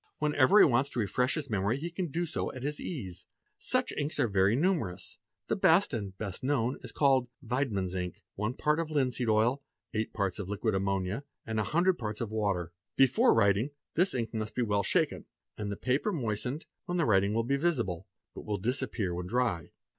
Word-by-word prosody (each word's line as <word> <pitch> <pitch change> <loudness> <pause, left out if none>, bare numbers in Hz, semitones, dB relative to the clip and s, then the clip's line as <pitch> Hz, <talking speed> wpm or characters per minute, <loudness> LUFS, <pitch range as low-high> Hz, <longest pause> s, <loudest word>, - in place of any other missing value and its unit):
Whenever 150 +4 +4
he - - +9
wants 135 +1 +2
to 125 - -4
refresh 125 +5 +1
his 155 -3 -3
memory 105 +1 0
he 170 +4 -5
can 175 +1 -2
do 170 +4 -1
so 160 - -3
at 130 - -7
his 145 +1 -2
ease. 100 - -6 0.3
Such - - 0
inks 145 +1 -3
are 125 - +3
very 100 +1 +3
numerous; 145 - -1 0.3
the - - +1
best, 180 -2 +4
and 100 -5 -4
best 100 -4 -5
known, 130 -2 +1
is - - -23
that - - -10
called 135 -3 +3
" 140 - -20
Weidmann's" 110 -8 -1
ink— 90 -1 -4
one 105 +5 -2
part 150 +1 +1
of 165 -2 -2
linseed 130 -5 0
oil, 115 +6 +3 0.3
eight 110 0 -1
parts 100 -1 -2
of 95 -2 -5
liquid 105 +2 -1
ammonia, 95 +4 -1 0.2
a 110 -1 -1
hundred 175 - +2
parts 105 -3 -4
of 115 -3 -3
water. 100 -6 -1 0.2
Before 135 -1 +5
writing, 105 +3 +3 0.2
this 180 +1 +2
ink 115 -2 -2
must 110 -1 -3
be 125 - +1
well 105 -2 +1
shaken - - 0 0.3
and 105 -1 -4
the 100 - -4
paper 135 +11 0
moistened, 125 - -2 0.2
when 180 0 -2
the 165 - +2
writing 100 0 +3
will 115 - +2
be 135 +4 +1
visible 120 - -1 0.3
but - - -8
will 105 -1 -2
disappear 115 -3 -2
when 90 +1 -4
_ - - -10
dry. 115 -9 0
120 Hz, 205 wpm, -30 LUFS, 100-145 Hz, 0.3 s, he